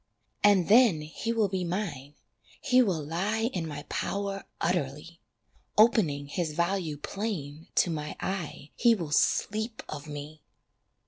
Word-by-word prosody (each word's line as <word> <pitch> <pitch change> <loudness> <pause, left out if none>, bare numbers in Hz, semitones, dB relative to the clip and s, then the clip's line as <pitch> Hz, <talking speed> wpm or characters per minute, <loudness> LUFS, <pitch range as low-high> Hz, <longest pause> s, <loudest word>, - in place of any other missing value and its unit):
And 200 -4 +5
then 215 -7 +6
he 160 +9 -4
will 225 -3 +2
be 190 -1 -2
mine, 170 -7 -4 0.4
he 255 -2 +4
will 175 -10 0
lie 210 - -1
In 170 -3 -2
my 145 -1 -6
power 200 -1 -3
utterly, 165 -1 -2 0.6
Opening 205 -11 +4
his 155 +2 -2
value 170 -2 -1
plain 160 -5 -5
to 175 - +3
my 150 -1 -4
eye 170 -6 -4
He 235 -1 +5
will 165 -7 -5
sleep 220 +8 +1
of 145 0 -7
me. 150 +1 -8
175 Hz, 135 wpm, -29 LUFS, 150-205 Hz, 0.6 s, then